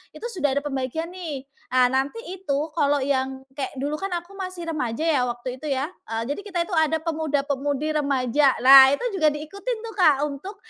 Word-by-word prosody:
itu - - -8
sudah 290 - 0
ada 285 - +1
pembagian 275 +4 -3
nih. 300 -7 -6 0.3
Ah 255 -1 +5
nanti 270 - -1 0.2
itu, 305 -4 -2
kalau 290 -3 +2
yang 265 -1 -1 0.2
kayak 275 - -3
dulu 290 +2 -2
kan 390 0 -4
aku 350 +3 -20
masih 370 -3 -6
remaja 275 -3 -2
ya 290 -6 +3
waktu 240 +1 -4
itu 305 - -6
ya, 270 +2 0 0.2
eee, 225 0 -2
jadi - - -8
kita 365 -4 -3
itu 365 - -7
ada 315 0 +3
pemuda-pemudi 290 -2 -1
remaja. 275 -1 +2
Nah 265 +1 +10
itu 385 - -2
juga 310 -4 +3
diikutin 395 +11 -5
tuh 445 - -8
Kak, 315 -7 +6
untuk, 295 +9 -7
290 Hz, 190 wpm, -24 LUFS, 265-325 Hz, 0.3 s, Nah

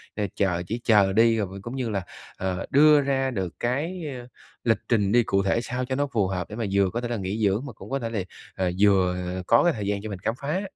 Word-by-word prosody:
Ờ, 105 -1 -1
chờ 90 -3 +1
chỉ 115 +5 -3
chờ 100 -4 +4
đi 115 +1 +4
rồi 105 - -1
vừa 95 +2 -9
cũng 120 +5 -6
như 125 -3 -2
là, 100 -3 -1 0.4
ờ, 95 0 -2
đưa 150 +1 +6
ra 135 -1 0
được 95 -6 -3
cái 160 +9 -2 0.6
lịch 115 -3 +3
trình 105 -4 +2
đi 120 +1 +5
cụ 100 -3 +1
thể 100 +4 +1
sao 125 +1 -3
cho 130 +1 -2
nó 145 +1 0
phù 110 -8 0
hợp 90 -2 -3
để 105 - -7
mà 115 -1 -2
vừa 100 -1 +3
có 115 +6 -3
thể 120 - -3
là 120 - -2
nghỉ 100 +2 -3
dưỡng 105 +7 +1
mà 125 - -7
cũng 100 0 -12
có 135 +1 -1
thể 115 -3 -3
là, 115 - -2 0.4
à, 95 -1 0
vừa 95 -3 +4 0.3
có 115 - +5
cái 175 - +3
thời 105 -5 -4
gian 100 -1 -1
cho 110 - -6
mình 100 - -6
khám 110 +5 -2
phá. 150 +7 -1
110 Hz, 270 wpm, -25 LUFS, 100-125 Hz, 0.6 s, đưa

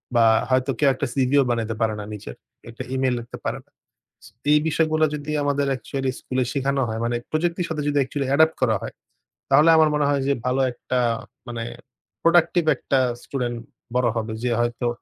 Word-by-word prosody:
বা 115 -1 +5 0.2
হয়তো 130 +1 +2
কেউ 145 - +5
একটা 130 - -2
CV 130 -2 +1
ও - - +3
বানাইতে 115 -2 -1
পারেনা 110 -2 0
নিজের, 95 -13 -8 0.3
একটা 115 - -7
ইমেইল 130 -1 +1
লিখতে 120 - -9
পারেনা। - - -4 0.8
এই 150 - +6
বিষয়গুলো 155 0 +2
যদি 150 0 -5
আমাদের 145 0 0
actually 135 +2 -3
স্কুলে 130 0 -1
শিখানো 140 -1 0
হয় 110 0 -3
মানে 120 0 0
প্রযুক্তির 170 +2 0
সাথে 155 -2 -3
যদি 145 - -1
actually 140 +1 -3
Adopt 160 +2 +4
করা 115 -4 +3
হয়। - - -7 0.6
তাহলে 150 +4 +6
আমার 155 -1 +5
মনে 150 -1 +2
হয় 140 -1 +1
যে 140 - +3
ভালো 125 +2 +1
একটা 125 +1 -3 0.5
মানে 120 -1 -4 0.6
productive 170 0 +3
একটা 135 +1 0 0.2
স্টুডেন্ট 120 -3 -3 0.4
বড় 125 -1 +3
হবে। 110 0 -3
যে 125 - +1
হয়তো 120 0 -1
135 Hz, 175 wpm, -23 LUFS, 120-150 Hz, 0.8 s, এই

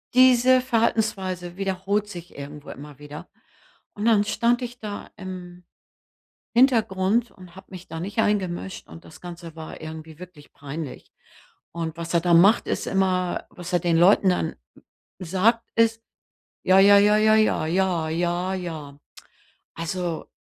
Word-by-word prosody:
diese 255 0 +6
Verhaltensweise 195 -7 -1
wiederholt 195 +2 -1
sich 175 -2 -10
irgendwo 145 +1 -9
immer 145 -1 -11
wieder. 145 +1 -10 0.7
Und 210 +2 -4
dann 215 -3 +4
stand 235 +3 +1
ich 245 0 -7
da 210 -2 -7
im 180 -2 -9 0.9
Hintergrund 230 -3 +2
und 180 -2 -15
habe 190 - -13
mich 185 -1 -10
da 160 0 -6
nicht 200 +5 -6
eingemischt 190 -3 -2
und 165 - -13
das 160 - -14
Ganze 170 -2 -9
war 160 -1 -9
irgendwie 160 0 -9
wirklich 180 -5 -13
peinlich. 145 0 -8 0.6
Und 165 -1 -4
was 170 +1 -5
er 170 - +4
da 175 0 +2
macht, 200 +7 +5
ist - - -2
immer, 185 -2 0
was 180 +1 -9
er 175 - +3
den 170 -1 +1
Leuten 190 +1 +5
dann 180 - -1 0.6
sagt, 195 +7 +1
ist: 225 0 +2 0.6
„Ja, 185 +1 +6
ja, 200 +1 +7
ja, 210 +1 +4
ja, 215 0 +4
ja, 215 -7 +2
ja, 175 -2 0
ja, 175 +3 -1
ja.“ 155 -6 -7 0.8
Also 170 0 -4
185 Hz, 145 wpm, -24 LUFS, 170-210 Hz, 0.9 s, ja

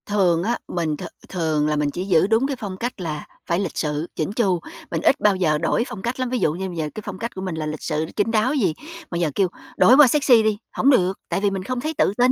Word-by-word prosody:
Thường 180 -5 +2
á, 235 +4 0
mình 160 -4 -2
th - - -8 0.3
thường 155 -4 0
là 150 - +1
mình 150 -1 +1
chỉ 180 +5 -4
giữ 185 -2 +3
đúng 225 +5 +2
cái 280 - -2
phong 195 -3 -5
cách 240 -2 -4
là 155 -3 -4 0.2
phải 170 - 0
lịch 195 -4 -3
sự, 150 +1 -1
chỉn 155 +4 -2
chu, 195 -6 +1 0.3
mình 165 - -1
ít 275 - +3
bao 210 -2 +3
giờ 160 -5 +2
đổi 165 +8 +1
phong 230 -6 -7
cách 240 +5 -3
lắm, 255 -1 -1
ví 250 0 -1
dụ 155 - +2
như 190 +3 -4
bây 175 -2 -7
giờ 155 -2 -2
cái 215 - -5
phong 190 -2 -6
cách 235 +2 -5
của 190 - -5
mình 185 -3 -3
là 155 -1 -3
lịch 155 0 -5
sự, 155 0 -1
chín 215 +1 +1
đáo 225 +4 +2
gì, 200 - +1 0.4
mà 170 - -2
giờ 170 -3 0
kêu 195 - +3 0.3
đổi 255 - +7
qua 295 -2 +9
sexy 250 -4 +4
đi, 215 -1 +1
hổng 270 - +2
được, 190 -8 +3
tại - - 0
vì 205 - +3
mình 190 -1 -3
không 255 +5 -3
thấy 310 +4 -2
tự - - +3
tin. 250 +1 +5
190 Hz, 290 wpm, -22 LUFS, 165-230 Hz, 0.4 s, qua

